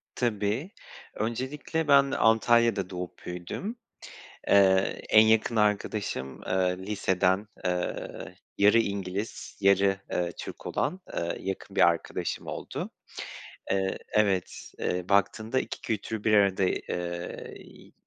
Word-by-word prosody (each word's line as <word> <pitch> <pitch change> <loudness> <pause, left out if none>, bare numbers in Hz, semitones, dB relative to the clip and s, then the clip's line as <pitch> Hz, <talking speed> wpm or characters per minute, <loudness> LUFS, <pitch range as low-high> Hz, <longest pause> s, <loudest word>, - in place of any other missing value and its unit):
Tabii. 115 - -1 0.4
Öncelikle, 130 +8 -2
ben 140 -1 +6
Antalya'da 115 -3 +3
doğup 90 -1 -7
büyüdüm. 90 - -5 0.7
Eee, - - +5 0.5
en 110 - +8
yakın 110 +1 +3
arkadaşım, 100 - -1
eee, 90 -1 +1
liseden, 95 0 0 0.2
eee, 90 -1 -3 0.2
yarı 105 +3 +6
İngiliz, 100 0 -3
yarı, 100 0 +4
eee, 90 -1 0
Türk - - -8
olan, 185 - -1
eee, 85 0 -2
yakın 95 0 -5
bir - - +7
arkadaşım - - -2
oldu. - - -5 0.8
Eee, 95 0 0
evet, 100 -4 0
eee, 90 0 -1
baktığında, 110 +5 +2
2 - - -5
kültürü 110 0 -3
bir 110 - +2
arada, 100 -2 +4
eee, 85 -1 -3
iii, - - -16
100 Hz, 115 wpm, -28 LUFS, 90-110 Hz, 0.8 s, en